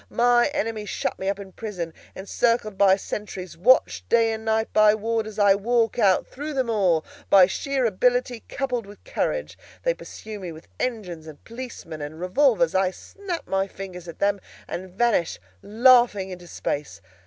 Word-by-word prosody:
My 240 0 +4
enemies 225 -7 -3
shut - - -3
me 190 - -1
up 200 - -1
in 195 -1 -10
prison, 180 -7 -5 0.2
encircled 215 +2 0
by 190 -1 +5
sentries, 195 -2 -6
watched 95 - +3
night 230 - +6
and 220 0 -4
day 220 0 +2
by 215 0 +6
warders; 220 0 -2
I 205 -2 +6
walk 230 +3 +1
out 195 -4 +4
through 295 +2 -6
them 255 -3 0
all, 180 -7 +2 0.2
by 190 -2 +8
sheer 265 +7 -1
ability 245 +2 +1
coupled 250 -6 -2
with 205 0 -14
courage. - - -3 0.2
They - - +2
pursue 215 - -9
me 180 -3 -6
with 160 +1 -12
engines, 180 -10 -4
and 150 -2 -12
policemen, 230 -10 -8
and 150 +2 -7
revolvers; 255 +7 +2
I 190 0 +3
snap 355 - -7
my 195 0 0
fingers 185 -3 -9
at 165 - -9
them, 200 -1 +1 0.3
and 185 +2 -6
vanish, 200 -2 +1 0.2
laughing, 230 -4 +4
into 175 -1 -9
space. 150 -3 -4
210 Hz, 165 wpm, -24 LUFS, 185-240 Hz, 0.3 s, by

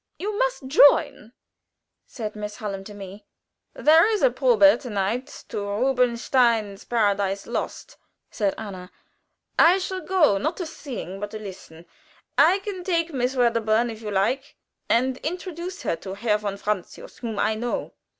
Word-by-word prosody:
"You 415 +2 -3
must - - 0
join," 280 -4 +4 0.8
said 215 -4 -6
Miss 210 0 -6
Hallam 200 -4 -5
to 210 - -9
me. 200 +1 -10 0.5
"There 320 +6 +5
is 425 - 0
a - - +5
probe 440 -13 +5
to 255 - -8
night 210 +5 -1 0.2
to - - -3
Rubinstein's 235 -1 +1
'Paradise 200 -4 0
Lost,'" - - -5 0.3
said 200 -2 -1
Anna. 190 -4 -8 0.7
"I 345 +3 +7
shall 375 0 -4
go, 320 - +3
not 315 - -2
to 360 - -3
sing, 250 - -7
but 205 0 -4
to 215 - -7
listen. 185 -5 -10 0.5
I 380 - +5
can 385 -3 -5
take 335 -3 0
Miss 255 0 -1
Wedderburn, 230 -1 +2
if 220 0 -10
you 215 - -5
like, 240 +9 -1 0.3
and 255 +2 +2
introduce 360 +3 -5
her - - 0
to 190 +3 -7
Herr 210 0 +1
von 200 -1 -4
Francius, 200 -3 -5
whom 225 -4 -5
I 215 +2 +2
know." 235 +2 -3
235 Hz, 155 wpm, -24 LUFS, 205-305 Hz, 0.8 s, I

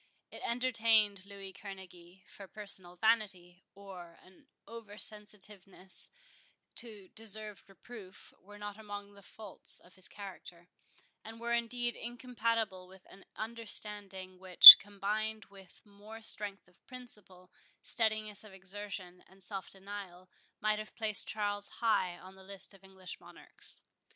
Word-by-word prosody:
It - - -12
entertained 225 -5 +1
Louis 195 -1 -11
Kerneguy; 190 -2 -13
for 195 - -14
personal 190 -3 -7
vanity, 190 -4 -2
or 185 -4 -12
an 190 +10 -23 0.2
over 225 -3 -12
sensitiveness 200 -4 -2 0.7
to 210 -6 -5
deserved 215 -2 0
reproof, 195 -1 -14
were 205 +2 -16
not 205 0 -9
among 205 -1 -10
the 200 - -17
faults 210 0 -7
of 180 - -22
his 185 -1 +2
character, 180 -3 -13 0.5
and 225 +1 -12
were 235 0 -4
indeed 240 0 -3
incompatible 230 -5 -4
with 190 0 -19
an 195 - -17
understanding, 205 -4 -4
which, 185 -1 +13
combined 210 +2 -5
with 195 0 -18
more 210 +2 -14
strength 205 -3 0
of 180 - -29
principle, 210 -8 -13 0.3
steadiness 215 -2 -3
of 215 -3 -15
exertion, 190 -1 -9
and 190 0 -9
self 195 0 -5
denial, 190 -2 -11 0.3
might 215 0 -1
have 215 - -10
placed 220 -3 0
Charles 205 -1 -3
high 190 -6 -2
on 185 +1 -15
the 190 0 -17
list 195 +1 -6
of 195 -1 -19
English 190 -2 -11
monarchs. - - 0
205 Hz, 130 wpm, -31 LUFS, 190-215 Hz, 0.7 s, which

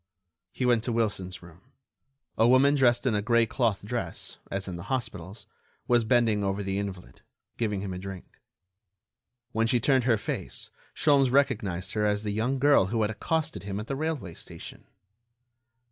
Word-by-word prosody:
He 125 - -2
went 120 -3 +3
to 125 - -1
Wilson's 100 -6 -1
room. 85 0 -15 0.7
A 115 - +4
woman 130 +3 +5
dressed 130 -3 +3
in 125 - +2
a 105 - +1
gray 115 +1 +3
cloth 110 -4 0
dress, 120 +2 -5
as 95 0 -3
in 90 - -4
the 85 +2 -8
hospitals, 110 -6 -4 0.4
was 120 -1 +4
bending 110 -3 +3
over 100 +1 -1
the 95 0 -2
invalid, 95 -10 -7 0.4
giving 105 -4 -1
him 95 -2 -4
a 90 - -5
drink. 95 -1 -9 1.1
When 115 0 +1
she 120 +1 +2
turned 130 +1 +3
her 120 -3 +4
face - - -5 0.2
Sholmes 140 -3 +4
recognized 105 -10 +1
her 105 - 0
as 105 0 +1
the 105 - -2
young 115 +6 0
girl 140 -8 +4
who 110 +2 0
had 105 - 0
accosted 160 +8 -2
him 100 0 -4
at 105 - -5
the 135 - -3
railway 145 - -3
station. - - -11
110 Hz, 175 wpm, -28 LUFS, 100-125 Hz, 1.1 s, woman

